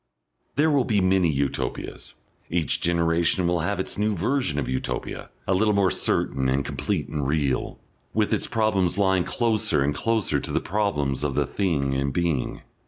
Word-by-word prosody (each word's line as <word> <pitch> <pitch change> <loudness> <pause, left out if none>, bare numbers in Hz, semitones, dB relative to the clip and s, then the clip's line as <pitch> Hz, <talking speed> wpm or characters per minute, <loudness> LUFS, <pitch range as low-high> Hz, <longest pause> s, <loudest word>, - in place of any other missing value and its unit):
There 155 +2 +3
will 140 -3 +3
be 110 -4 +1
many 95 -2 +3
Utopias. 70 -2 -3 0.3
Each 85 -3 +1
generation 85 +1 +2
will 85 0 +1
have 100 +5 -1
its 95 - -3
new 105 0 +1
version 105 - 0
of 75 - -1
Utopia, 65 0 -4 0.2
a 95 - +1
little 105 +2 +2
more 95 -2 +3
certain 65 -1 0
and 70 +1 +1
complete - - -2
and 75 -3 -2
real, 70 -3 0 0.3
with 110 -1 +1
its - - 0
problems 100 -5 +1
lying 95 -3 +2
closer 110 - +1
and 75 +1 +1
closer 110 +8 0
to - - -4
the - - +1
problems 75 -10 -1
of 70 -2 -1
the 75 - +2
Thing 70 -6 0
in 70 +1 0
Being. 80 -2 -1
85 Hz, 170 wpm, -25 LUFS, 75-105 Hz, 0.3 s, There